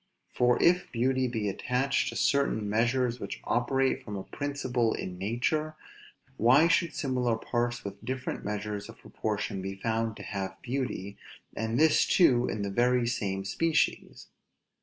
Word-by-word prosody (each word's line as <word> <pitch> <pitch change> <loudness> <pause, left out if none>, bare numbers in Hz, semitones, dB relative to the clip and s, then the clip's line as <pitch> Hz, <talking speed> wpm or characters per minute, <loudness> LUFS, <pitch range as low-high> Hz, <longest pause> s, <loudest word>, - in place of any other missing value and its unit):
For 125 0 +3
if 180 +1 +3
beauty 130 +2 +1
be 110 -4 -2
attached 125 +7 0
to - - -7
certain 140 -7 +1
measures 120 +3 +1
which 100 - -6
operate 130 +3 +1
from 105 - -6
a 95 - -5
principle 130 -5 -1
in 90 -1 -6
nature, 140 +10 -1 0.6
why 130 +9 +6
should 170 -1 +2
similar 125 -6 0
parts 120 +1 -2
with 100 +1 -7
different 130 +2 -4
measures 105 0 -4
of - - -11
proportion 105 -2 -3
be 95 +1 -5
found 115 +2 -2
to - - -8
have 95 -2 -5
beauty, 120 -6 -3 0.4
and 115 +2 -1
this 155 0 +4
too 125 -9 +4
in 105 - -3
the 100 - -3
very 120 +3 +2
same 95 -5 -2
species? 165 +10 0
120 Hz, 150 wpm, -29 LUFS, 105-130 Hz, 0.6 s, why